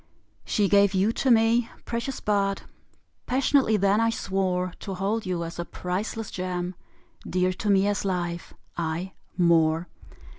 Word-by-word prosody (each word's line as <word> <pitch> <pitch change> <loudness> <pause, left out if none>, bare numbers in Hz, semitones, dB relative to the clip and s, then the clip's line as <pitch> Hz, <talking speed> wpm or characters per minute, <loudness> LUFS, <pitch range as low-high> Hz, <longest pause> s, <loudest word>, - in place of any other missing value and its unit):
She 205 -2 +1
gave 200 0 +4
you 195 +4 +3
to 265 - 0
me. 230 0 +4 0.2
Precious 235 +3 -3
bud! 200 -1 0 0.6
Passionately 260 -3 +3
then 200 +1 +3
I 230 - +3
swore 185 -4 -1
To 195 - -5
hold 200 +3 -1
you 175 -2 -1
as 165 +1 -7
a - - 0
priceless 200 +6 -4
gem, 180 -1 -3 0.6
Dear 185 0 +1
to 205 +3 -3
me 195 -1 +4
as 205 0 0
life 175 -3 -2 0.2
aye 170 +3 -3 0.2
more! 165 -1 +3
195 Hz, 145 wpm, -26 LUFS, 180-215 Hz, 0.6 s, gave